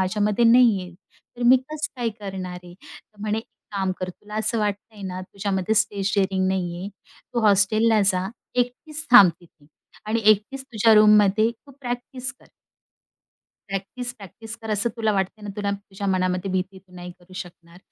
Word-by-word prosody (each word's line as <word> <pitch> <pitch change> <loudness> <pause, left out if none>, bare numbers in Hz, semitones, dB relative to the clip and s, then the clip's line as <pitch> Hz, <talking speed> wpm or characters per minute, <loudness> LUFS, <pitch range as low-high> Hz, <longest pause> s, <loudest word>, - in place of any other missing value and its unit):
माझ्यामध्ये 210 +4 +1
नाही 230 -3 +6
आहे. 180 0 -10 0.4
तर 245 - -6
मी 255 +2 +8
कसं 310 0 -4
काय 235 - +1
करणार 190 -3 -5
आहे?" 175 0 -12
तर 205 +2 -17
म्हणे, 215 +1 -1
"एक 225 - -8 0.3
काम 190 -1 0
कर. 185 0 -3
तुला 210 +3 -13
असं 220 +2 0
वाटतंय 210 0 -3
ना? 185 0 -5
तुझ्यामध्ये 195 +1 -2
स्टेज 205 -2 +1
डेअरिंग 190 -1 +1
नाहीये. 180 0 -2 0.5
तू 240 - +2
हॉस्टेलला 215 +2 +4
जा, 185 +1 -1 0.3
एकटीच 250 +6 -2
थांब 205 -7 +9
तिथे 165 -4 -22 0.4
आणि 225 +1 0
एकटीच 215 +6 +3
तुझ्या 225 -3 +3
रूममध्ये 210 0 +5
तू 235 +4 -17
प्रॅक्टिस 250 +1 -4
कर." 260 - -24 1.2
प्रॅक्टिस, 220 +6 -5
प्रॅक्टिस 220 +3 -10
कर 220 - -5
असं 210 +2 +1
तुला 220 -2 +1
वाटतंय 195 +2 -2
ना? 205 - -5
तुला 205 -1 -1
तुझ्या 200 0 -6
मनामध्ये 185 0 0
भीती 185 +1 -2
तू 185 -1 -22
नाही 180 0 -8
करू 180 +1 -20
शकणार. 170 -1 -10
205 Hz, 165 wpm, -23 LUFS, 190-225 Hz, 1.2 s, थांब